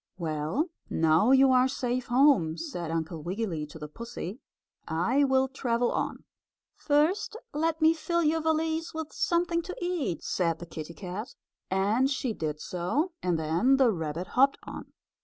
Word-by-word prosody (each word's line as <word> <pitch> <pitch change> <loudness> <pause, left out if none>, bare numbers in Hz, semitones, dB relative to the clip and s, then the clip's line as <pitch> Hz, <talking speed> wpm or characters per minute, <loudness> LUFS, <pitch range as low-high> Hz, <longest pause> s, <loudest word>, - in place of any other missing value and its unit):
"Well, 165 - -1 0.2
now 160 +7 +3
you 265 0 +6
are 255 0 +5
safe 250 -1 -2
home," 240 - +4
said 175 - -5
Uncle 160 0 -3
Wiggily 175 -3 -3
to 150 - -11
the 150 -1 -7
pussy, 230 - -7 0.5
"I 205 - +2
will 265 0 +3
travel 245 -2 0
on." - - -2 0.5
"First, 310 +9 +1 0.2
let 320 +2 0
me 320 +1 +6
fill 340 +1 -1
your 320 +1 +2
valise 320 +1 0
with 320 -1 -5
something 340 0 +1
to 365 +2 -7
eat," 345 - -2
said 170 -3 0
the 175 - -8
kittie 165 0 -8
cat, 200 +5 -6 0.3
and 205 +8 +2
she 265 -4 -1
did 155 -5 -3
so, 185 - -1
and 180 -2 +1
then 170 +13 +2
the 260 -4 +5
rabbit 165 -1 -4
hopped 275 +2 +4
on. - - -9
240 Hz, 160 wpm, -28 LUFS, -, 0.5 s, you